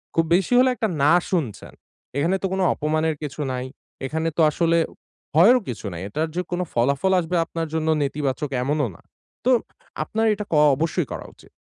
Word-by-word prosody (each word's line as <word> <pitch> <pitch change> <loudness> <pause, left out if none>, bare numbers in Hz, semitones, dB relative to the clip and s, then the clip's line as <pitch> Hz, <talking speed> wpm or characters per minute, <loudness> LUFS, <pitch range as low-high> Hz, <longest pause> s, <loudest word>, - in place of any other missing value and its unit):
খুব 165 - +3
বেশি 195 +6 +1
হলে 255 +1 +5
একটা 230 -3 0 0.2
না 145 - +5 0.2
শুনছেন। 160 - -3 0.4
এখানে 165 +7 +2
তো - - -1
কোনো 190 0 0
অপমানের 155 +1 0
কিছু 150 +1 -5
নাই, 125 0 -3 0.4
এখানে 160 +4 -2
তো - - +4
আসলে 170 +2 +2 0.6
ভয়েরও 230 +10 +6
কিছু 115 -2 -6
নাই। 85 - -6
এটার 155 +10 -2
যে 180 - +1
কোন 175 - -1
ফলাফল 140 +10 +2
আসবে 175 +1 -2
আপনার 165 0 -4
জন্য 160 -1 -1
নেতিবাচক 140 0 -2
এমনও 145 0 0
না। - - -18 0.4
তো 255 - +4 0.5
আপনার 220 +1 -1
এটা 210 0 -5
ক - - -2 0.2
অবশ্যই 165 +2 -1
করা - - -6
উচিত। - - -20
160 Hz, 180 wpm, -23 LUFS, 145-180 Hz, 0.6 s, ভয়েরও